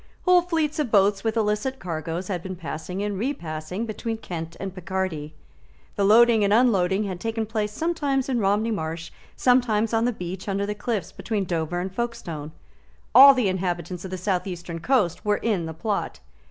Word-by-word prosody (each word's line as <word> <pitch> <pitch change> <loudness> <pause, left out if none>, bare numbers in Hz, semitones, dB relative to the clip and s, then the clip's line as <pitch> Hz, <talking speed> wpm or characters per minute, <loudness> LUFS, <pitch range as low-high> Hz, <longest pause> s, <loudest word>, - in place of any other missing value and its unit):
Whole 360 -1 +6
fleets 320 -4 -1
of 290 -5 0
boats 200 -1 +3
with 225 0 0
illicit 215 +5 0
cargoes 165 - -4
had 180 -4 -2
been 185 +1 -6
passing 180 +3 -5
and 205 -2 -2
repassing 180 - -3
between 225 +1 -4
Kent 165 -6 -6
and 195 -1 -5
Picardy. 185 -5 -3 0.6
The 200 - 0
loading 225 +1 +6
and 200 - +2
unloading 205 -4 +3
had 190 -3 -4
taken 225 +2 -2
place 215 -1 -2
sometimes 285 -1 -1
in 255 -3 0
Romney 210 +2 +1
Marsh, 165 -4 -4 0.2
sometimes 235 -3 +2
on 225 +1 +2
the 245 - +2
beach 185 -2 -6
under 200 +1 0
the 210 - -2
cliffs 210 -1 -3
between 210 -4 -2
Dover 170 0 -2
and 185 +1 -4
Folkstone. 175 -10 -4 0.6
All 270 +3 +10
the 250 -5 +2
inhabitants 180 -1 -2
of 190 - -6
the 185 - -4
south 185 +1 -1
eastern 175 -2 -6
coast 180 -5 +1
were 210 0 +2
in 195 -8 -1
the 160 - -5
plot. 205 - -2
200 Hz, 180 wpm, -24 LUFS, 175-230 Hz, 0.6 s, All